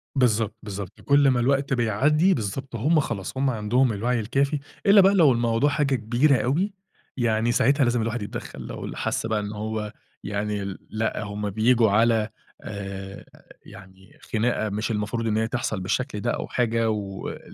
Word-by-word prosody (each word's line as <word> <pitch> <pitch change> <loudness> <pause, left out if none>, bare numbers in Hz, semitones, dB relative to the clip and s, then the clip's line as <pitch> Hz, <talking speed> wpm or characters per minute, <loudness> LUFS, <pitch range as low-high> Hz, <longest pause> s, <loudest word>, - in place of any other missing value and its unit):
بالضبط، 115 -4 +2
بالضبط، 100 -1 -7
كلّ 140 -1 +4
ما 125 -2 +3
الوقت 135 +2 +1
بيعدّي، 145 - +3
بالضبط 120 +4 -4
هُم 150 +8 +2
خلاص، 110 -3 -4
هُم 135 0 +2
عَندهم 120 +2 +1
الوعي 120 +4 0
الكافي 140 +6 0 0.3
إلّا 200 0 +8
بقى 195 +1 +5
لو 160 -8 +6
الموضوع 120 +4 +2
حاجة 145 -2 +1
كبيرة 120 +6 +2
أوي، 175 +11 0 0.4
يعني 115 -1 +1
ساعتها 135 +4 +3
لازم 120 -1 +1
الواحد 115 +1 -2
يتدخّل 105 - -7
لو - - -6
اللي - - -7
حسّ - - -1
بقى 110 -1 0
إن 105 0 -4
هو 105 0 -4 0.3
يعني 105 0 -2
ال 95 -1 -5
لأ 110 0 -2
هُم 105 0 -4
بييجوا 110 +1 +3
على 110 0 +3 0.3
آآ، 100 -1 -7 0.4
يعني 95 -1 -15 0.2
خناقة 110 -1 +1
مش 105 +3 -2
المفروض 110 +2 -2
إن 110 0 +1
هي 110 - +1
تحصَل 115 -4 -2
بالشكل 105 +3 -2
ده 120 +3 -1
أو - - -3
حاجة 115 -2 0
ول 100 -3 -4
115 Hz, 170 wpm, -24 LUFS, 105-130 Hz, 0.4 s, إلّا